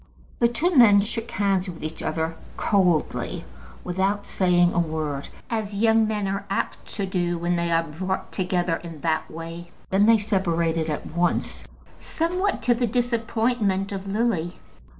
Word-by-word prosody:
The 235 - +5
two 315 +10 0
men 210 -6 +8
shook 230 +2 -4
hands 195 -3 0
with 170 -3 -8
each 155 +1 -5
other, 160 +1 -2 0.2
coldly, 180 - +1 0.4
without 195 +3 0
saying 175 -1 +3
a - - +1
word, 155 -4 -2 0.2
as 215 -3 -3
young 225 +1 +4
men 210 -2 -1
are 195 +1 -2
apt 195 - -2
to 200 - -1
do 175 -2 -1
when 175 +1 0
they 170 0 0
are 165 0 +3
brought 185 +4 -4
together 180 -3 0
in 165 -4 -10
that 160 -1 0
way. 165 +1 -8 0.2
Then 200 +2 +4
they 230 0 +7
separated 170 -6 0
at 150 - -3
once, 175 +2 -1 0.3
somewhat 360 +5 -1
to 245 - +4
the 240 0 0
disappointment 225 -4 0
of 195 0 -5
Lily. 195 -5 0
190 Hz, 155 wpm, -24 LUFS, 170-220 Hz, 0.4 s, men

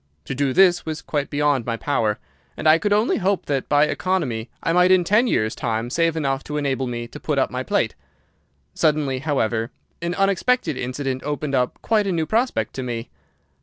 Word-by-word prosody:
To - - -4
do 135 0 0
this 180 +3 +4
was 160 -1 -4
quite 145 -2 -2
beyond 145 -3 +1
my 115 0 -2
power, 115 -6 0 0.4
and - - -1
I 155 +1 +6
could 205 +5 -1
only 210 +3 +3
hope 195 0 0
that 140 -2 -2
by 145 0 +5
economy 150 -10 -1
I 165 - +1
might 180 +1 +5
in 185 -1 +5
ten 210 +8 +3
years' 110 - +1
time 115 0 -2
save 165 +1 +1
enough 135 -3 -1
to 150 - -4
enable 135 -3 -1
me 120 -1 -4
to - - -10
put - - -2
up - - +1
my - - -3
plate. - - 0 0.8
Suddenly, 150 -4 +1
however, 115 -6 0 0.3
an 170 +1 -2
unexpected 195 +6 +1
incident 130 +1 -3
opened 145 0 -3
up 125 -2 0
quite 215 -3 +2
a - - +1
new 165 -3 0
prospect 235 +8 0
to - - -2
me. 120 -2 -5
145 Hz, 200 wpm, -22 LUFS, 130-180 Hz, 0.8 s, I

